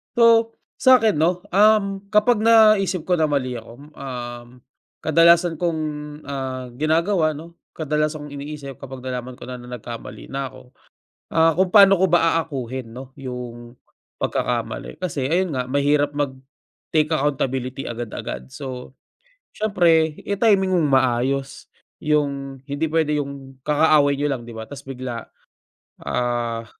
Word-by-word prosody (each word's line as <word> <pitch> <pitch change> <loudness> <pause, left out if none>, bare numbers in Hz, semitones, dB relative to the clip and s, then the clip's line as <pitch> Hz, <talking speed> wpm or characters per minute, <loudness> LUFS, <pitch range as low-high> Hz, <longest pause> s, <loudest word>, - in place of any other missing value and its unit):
So, 230 -1 +5 0.2
sa'kin 235 - +5
'no, 175 +3 +1
um, 200 0 +4
kapag 210 +2 +3
naisip 215 -6 +5
ko 180 -2 +1
na 155 - +3
mali 130 -4 -1
ako, 115 - -14
mm, 145 +4 -15
um, 120 -3 -6 0.6
kadalasan 170 +1 +4
kong, 170 -3 0 0.4
ah, 130 -3 -5
ginagawa 160 0 +2
'no, 170 +3 -12 0.2
kadalasan 150 0 -1
kong 145 - -10
iniisip 140 -2 -8
kapag 130 -2 -9
nalaman 125 -1 -5
ko - - -13
na 125 -1 -7
nagkamali 120 0 -9
na 135 0 -2
ako, 130 -1 -15 0.6
ah, 165 0 +4
kung 185 -1 +2
paano 195 -2 +8
ko 190 - +2
ba 165 -1 +4
aakuhin 130 -7 -4
'no 130 +1 -10
yung 125 -2 -8 0.4
pagkakamali. 155 - -2
Kasi 145 -7 -2
ayun 170 0 0
nga, 125 - -1
mahirap 145 +2 +1
mag-take 145 +2 -3
accountability 135 -2 -2
agad-agad. 110 - -6
So, 130 -2 -7 0.6
siyempre, 170 -7 +3 0.2
i-timing 200 -2 +2
mong 155 -5 +2
maayos, 130 +1 0 0.3
yung 140 -2 -1
hindi 145 +2 -2
pwede 155 -2 +1
yung 135 -2 -10
kakaaway 150 -1 +4
niyo 145 - 0
lang 130 -4 -3
di 115 - -9
ba 110 0 -7
tapos 145 +1 -11
bigla, 125 -3 -5 0.8
ah, 120 -2 -1
145 Hz, 135 wpm, -22 LUFS, 130-170 Hz, 0.8 s, paano